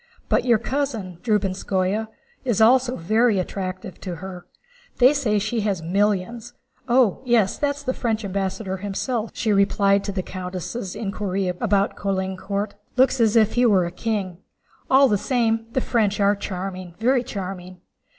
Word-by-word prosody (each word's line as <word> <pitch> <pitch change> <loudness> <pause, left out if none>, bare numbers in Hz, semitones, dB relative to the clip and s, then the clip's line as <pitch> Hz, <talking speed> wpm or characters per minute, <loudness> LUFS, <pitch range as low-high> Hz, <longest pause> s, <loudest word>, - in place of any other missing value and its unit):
But - - +2
your 235 -3 +5
cousin, 225 -9 -3
Drubetskóy, 200 -1 0 0.4
is 240 -6 0
also 250 +3 +4
very 215 +5 +2
attentive 185 -1 -4
to 180 -3 -5
her. 180 0 -9 0.5
They 255 +3 +6
say 245 -8 +1
she 225 +3 -1
has 200 -5 -1
millions. 205 +6 -1 0.4
Oh 240 -5 +3
yes, 235 -6 +2
that's 285 -1 -1
the 260 -2 -1
French 225 -4 -2
ambassador 190 0 -3
himself!" 210 +4 -3
she 215 -3 +1
replied 200 0 +3
to 200 - -2
the 190 -2 -3
countess' 185 +3 -5
inquiry 195 -3 -2
about 200 +2 0
Caulaincourt. 195 +1 -2 0.2
"Looks 260 0 +4
as 220 0 +3
if 220 -1 +4
he 245 - +2
were 190 -5 +4
a 170 - -4
king! 190 -3 -3 0.5
All 270 +1 +6
the 205 -5 +1
same, 225 -2 0
the 260 - +1
French 215 -5 +1
are 200 0 +4
charming, 185 -3 -6
very 245 +3 +2
charming. 185 -5 -7
205 Hz, 150 wpm, -23 LUFS, 190-235 Hz, 0.5 s, They